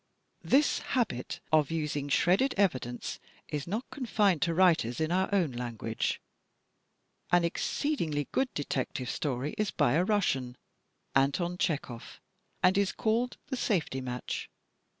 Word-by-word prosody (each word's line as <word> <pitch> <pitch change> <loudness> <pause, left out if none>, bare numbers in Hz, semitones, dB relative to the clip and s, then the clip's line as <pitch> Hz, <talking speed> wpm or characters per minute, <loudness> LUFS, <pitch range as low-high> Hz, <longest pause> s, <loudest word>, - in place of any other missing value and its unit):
This 285 +3 +3
habit 215 - -2
of 155 -3 +4
using 150 -3 -2
shredded 190 - +3
evidence 130 -11 0 0.3
is 150 0 -3
not 215 +8 -3
confined 210 - +1
to 170 -2 +2
writers 165 -10 +3
in 160 +1 0
our 185 +1 +2
own 180 -8 +2
language. 115 -2 -3 1.1
*An 175 -1 +5
exceedingly 170 - -1
good 265 -1 +1
detective 145 -2 -2
story 140 0 -2
is 210 -2 +1
by 120 - +2
a 165 +4 +3
Russian, 135 - 0 0.6
Anton 140 +6 +2
Chekhov, 140 -8 -3 0.4
and 190 +2 +5
is 200 -1 +2
called 230 +3 0
the 265 - -1
"Safety 165 - 0
Match." 125 -1 -4
165 Hz, 130 wpm, -30 LUFS, 135-200 Hz, 1.1 s, An